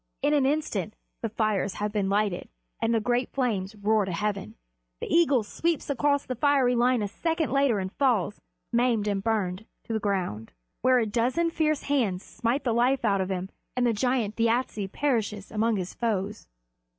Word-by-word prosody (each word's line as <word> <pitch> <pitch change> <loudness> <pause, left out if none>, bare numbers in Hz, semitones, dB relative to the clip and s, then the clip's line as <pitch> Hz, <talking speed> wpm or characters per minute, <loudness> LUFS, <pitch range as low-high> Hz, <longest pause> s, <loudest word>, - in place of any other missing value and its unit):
In 290 +1 +3
an 280 -3 +3
instant 250 - -1 0.3
the 225 - -1
fires 215 -3 0
have 210 0 -2
been 205 -2 0
lighted, 200 -2 0 0.3
and 225 - +2
the 230 - +3
great 245 +2 0
flames 220 -6 -1
roar 210 +1 +2
to 190 - -4
heaven. 195 - -2 0.4
The - - -4
eagle 290 -8 +3
sweeps 320 +7 -1
across 285 +1 +1
the 255 - -3
fiery 265 -1 +3
line 245 -1 +3
a - - -1
second 325 - -1
later 275 -5 +3
and 190 -1 -3
falls, 225 -8 +1 0.3
maimed 235 -3 +2
and 200 -1 -1
burned 210 -2 -1 0.2
to 230 - -5
the 220 - +1
ground; 185 - -2 0.3
where 255 0 +4
a 235 - +2
dozen 250 +10 +1
fierce 310 -3 0
hands 220 -10 0
smite 235 +5 -2
the 240 - +1
life 245 +2 +2
out 200 -2 +2
of 185 - -2
him, 190 0 -3 0.3
and 250 - +3
the 240 - +4
great 220 - -4
giant 245 -4 +1
Thjasse 230 -4 0
perishes 220 -8 -1
among 220 +1 +1
his 185 -2 -4
foes. 210 -3 -2
225 Hz, 185 wpm, -27 LUFS, 205-255 Hz, 0.4 s, where